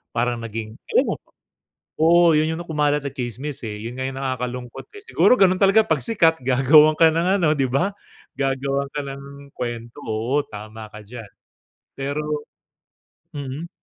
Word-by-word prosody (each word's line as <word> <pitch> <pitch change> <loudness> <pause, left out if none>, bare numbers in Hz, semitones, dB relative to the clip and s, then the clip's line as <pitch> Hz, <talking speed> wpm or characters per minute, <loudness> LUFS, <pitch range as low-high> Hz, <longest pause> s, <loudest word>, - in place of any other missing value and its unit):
Parang 120 0 0
naging 110 0 -6 0.2
ewan - - 0
ko - - -36 0.7
oo. 170 +2 +6
'Yun 155 +1 +1
'yung 165 - -6
na 175 - -11
kumalat 150 -2 +1
sa 140 - -3
tsismis 130 +3 -5
eh, 105 - -5
'yun 120 +2 -6
nga 130 - -3
yung 135 0 -6
nakakalungkot 125 -2 -4
eh. 410 - -11
Siguro 250 - +4
ganun 185 -1 +5
talaga 200 +3 +6
'pag - - +1
sikat, 165 -8 +2
gagawan 145 +4 +5
ka 165 - +8
ng 180 +5 +1
ano, 155 -2 +4
'di 135 -1 +1
ba? 175 +10 +1 0.5
Gagawan 135 0 -1
ka 150 - -4
ng 140 0 -10
kuwento. 120 +1 -5
Oo 115 +6 0
tama 110 +1 -9
ka 105 - -9
diyan. 110 -2 -10 0.7
Pero 140 +2 -3 1.1
mm. 145 +4 -6
135 Hz, 165 wpm, -22 LUFS, 120-155 Hz, 1.1 s, ka